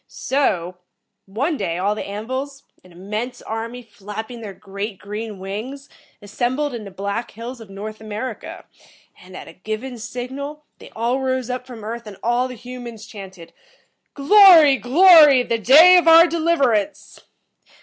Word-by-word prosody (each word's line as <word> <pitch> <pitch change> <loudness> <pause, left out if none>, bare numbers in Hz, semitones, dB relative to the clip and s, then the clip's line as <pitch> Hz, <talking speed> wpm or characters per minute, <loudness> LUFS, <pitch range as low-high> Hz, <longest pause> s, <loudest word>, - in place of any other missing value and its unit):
So, 185 -10 -2 0.5
one 275 - -2
day, 175 -6 -3
all 200 +3 0
the 210 - -6
An 205 +2 -6
vils, 275 +3 -6 0.2
an 185 - -19
immense 215 +8 -6
army, 230 +3 -6
flapping 220 +2 -9
their 210 -3 -7
great 200 +2 -7
green 210 +1 -7
wings, 220 +9 -7 0.3
assembled 250 +7 -2
in 225 -3 -7
the - - -8
Black 200 +5 -5
Hills 235 +2 -9
of 220 - -13
North 215 +2 -9
America, 245 - -7 0.6
and, 185 0 -13
at - - -10
a - - -12
given 220 +7 -7
signal, 275 +6 -7
they - - -13
all 235 +4 -1
rose 260 -2 -2
up 250 0 -6
from 235 -4 -11
Earth 230 +1 -7
and 200 -2 -10
all 240 +2 0
the 250 - -9
humans 240 -2 -10
chanted, 190 -5 -12 0.6
'Glory, 320 -2 +7
glory, 295 - +6
the 230 -1 -2
day 320 - +7
of 345 -2 +2
our 330 +1 +8
deliverance!'" 315 - -1
235 Hz, 155 wpm, -20 LUFS, 210-270 Hz, 0.6 s, our